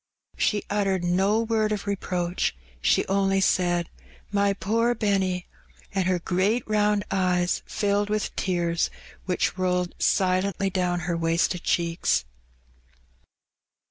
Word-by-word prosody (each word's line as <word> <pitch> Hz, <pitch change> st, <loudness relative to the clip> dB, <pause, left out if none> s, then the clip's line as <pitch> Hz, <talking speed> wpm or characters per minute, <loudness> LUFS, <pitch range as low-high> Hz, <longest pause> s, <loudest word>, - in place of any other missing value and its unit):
She 210 Hz, -1 st, +1 dB
uttered 195 Hz, -3 st, 0 dB
no 190 Hz, +5 st, +2 dB
word 220 Hz, -2 st, 0 dB
of 205 Hz, -1 st, -2 dB
reproach, 180 Hz, -, -1 dB, 0.3 s
she -, -, +3 dB
only 195 Hz, 0 st, +2 dB
said, 175 Hz, -2 st, +2 dB, 0.4 s
*'My 200 Hz, -1 st, +2 dB
poor 230 Hz, +5 st, +1 dB
Benny!" 190 Hz, -4 st, 0 dB, 0.5 s
and 190 Hz, -2 st, 0 dB
her 185 Hz, -1 st, +2 dB
great 190 Hz, +7 st, 0 dB
round 210 Hz, -1 st, +2 dB
eyes 180 Hz, -2 st, +1 dB
filled 205 Hz, -1 st, 0 dB
with 215 Hz, 0 st, -2 dB
tears, 170 Hz, -3 st, 0 dB, 0.4 s
which 185 Hz, 0 st, -1 dB
rolled 180 Hz, -1 st, 0 dB
silently 190 Hz, +1 st, +1 dB
down 180 Hz, -1 st, 0 dB
her 175 Hz, +1 st, -2 dB
wasted 165 Hz, +2 st, +1 dB
cheeks. 170 Hz, -, +1 dB
190 Hz, 115 wpm, -25 LUFS, 180-205 Hz, 0.5 s, she